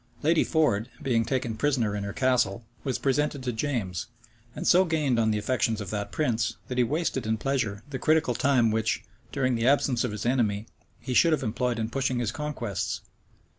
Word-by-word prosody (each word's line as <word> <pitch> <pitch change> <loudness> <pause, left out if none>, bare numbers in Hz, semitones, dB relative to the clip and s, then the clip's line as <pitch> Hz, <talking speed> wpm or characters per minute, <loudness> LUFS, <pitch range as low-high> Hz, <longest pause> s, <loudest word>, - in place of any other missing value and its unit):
Lady 160 +2 +4
Ford, 130 -9 +1
being 120 -4 +2
taken 120 -1 -1
prisoner 115 -4 +1
in 100 - -3
her 100 - -3
castle, 120 -3 +1 0.2
was 130 -3 -1
presented 140 0 0
to 125 -1 -2
James, 110 -8 -2 0.5
and - - -5
so 180 +1 +6
gained 150 -8 +1
on 110 -1 +3
the 105 - +1
affections 110 0 0
of 100 -4 -5
that 105 -1 -3
prince, 120 -7 0
that 125 0 -2
he - - +5
wasted 140 -2 -1
in 110 0 +1
pleasure 110 -5 -1
the 130 - -3
critical 155 -4 +2
time 120 -2 +3
which, 110 0 0 0.3
during 130 -3 +1
the 115 0 +1
absence 135 -3 +3
of 125 - -1
his 105 +2 -5
enemy, 110 -4 +1 0.3
he 130 - -4
should 165 +6 +5
have 150 - 0
employed 120 +1 -1
in 110 -1 -1
pushing 130 +1 -1
his 120 -2 -1
conquests. 130 - -3
125 Hz, 195 wpm, -27 LUFS, 110-140 Hz, 0.5 s, so